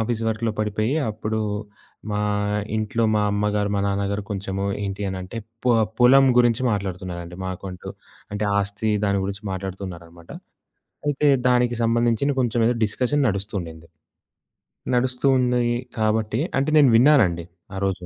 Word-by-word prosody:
Office 115 Hz, 0 st, -1 dB
వర్క్‌లో 110 Hz, +1 st, -1 dB
పడిపోయి 110 Hz, +5 st, 0 dB, 0.2 s
అప్పుడు 110 Hz, +1 st, -3 dB, 0.7 s
మా 105 Hz, -, -1 dB, 0.6 s
ఇంట్లో 110 Hz, +1 st, 0 dB
మా 105 Hz, -, +2 dB
అమ్మగారు, 105 Hz, 0 st, 0 dB
మా 100 Hz, -, +1 dB
నాన్నగారు 100 Hz, +1 st, -1 dB
కొంచెం 95 Hz, -1 st, -4 dB, 0.3 s
ఏంటి 100 Hz, +1 st, -4 dB
అనంటే 95 Hz, +3 st, -6 dB, 0.3 s
పొ 125 Hz, -, +4 dB, 0.3 s
పొలం 135 Hz, +3 st, +7 dB
గురించి 120 Hz, 0 st, +3 dB
మాట్లాడుతున్నారండి. 90 Hz, -3 st, -5 dB
మాకంటూ 95 Hz, 0 st, -6 dB, 0.4 s
అంటే, 105 Hz, +1 st, -2 dB
ఆస్తి 100 Hz, +2 st, -1 dB
దాని 100 Hz, -1 st, +1 dB
గురించి 100 Hz, +2 st, -5 dB
మాట్లాడుతున్నారనమాట. 90 Hz, -3 st, -7 dB, 0.8 s
అయితే 145 Hz, +1 st, +1 dB, 0.2 s
దానికి 125 Hz, -1 st, +3 dB
సంబంధించిన 120 Hz, +4 st, +2 dB
కొంచెం 120 Hz, -2 st, +1 dB
ఏదో 120 Hz, -, +1 dB
డిస్కషన్ 130 Hz, +7 st, 0 dB
నడుస్తూండింది. 95 Hz, -6 st, -4 dB, 1.1 s
నడుస్తూ 125 Hz, +2 st, 0 dB
ఉంది 125 Hz, -1 st, +2 dB, 0.3 s
కాబట్టి 110 Hz, +1 st, 0 dB, 0.2 s
అంటే 140 Hz, +3 st, +1 dB
నేను 145 Hz, -3 st, +6 dB
విన్నానండి 115 Hz, -, +4 dB, 0.3 s
ఆరోజు. 95 Hz, -2 st, -2 dB
105 Hz, 125 wpm, -23 LUFS, 95-120 Hz, 1.1 s, పొలం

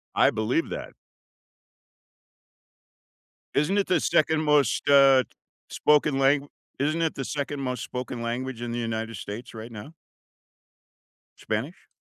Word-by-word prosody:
I -, -, +5 dB
believe 110 Hz, +9 st, -1 dB
that. -, -, -6 dB, 2.6 s
Isn't 150 Hz, +8 st, +2 dB
it 200 Hz, -, +1 dB
the 180 Hz, -3 st, +3 dB
2nd 155 Hz, +1 st, +2 dB
most, 150 Hz, -2 st, +2 dB
uh, 135 Hz, -2 st, +7 dB, 0.5 s
spoken 150 Hz, -2 st, +2 dB
lang 140 Hz, +1 st, +3 dB, 0.3 s
isn't 155 Hz, +4 st, 0 dB
it 160 Hz, -, 0 dB
the 135 Hz, -, -3 dB
2nd 145 Hz, +1 st, -4 dB
most 125 Hz, -1 st, -3 dB
spoken 125 Hz, -1 st, -5 dB
language 120 Hz, +1 st, -4 dB
in 120 Hz, -1 st, -4 dB
the 120 Hz, -, -2 dB
United 115 Hz, 0 st, -3 dB
States 115 Hz, +6 st, -7 dB
right 115 Hz, +1 st, -8 dB
now? 115 Hz, +8 st, -9 dB, 1.4 s
Spanish? 115 Hz, +11 st, -4 dB
135 Hz, 125 wpm, -26 LUFS, 120-150 Hz, 2.6 s, uh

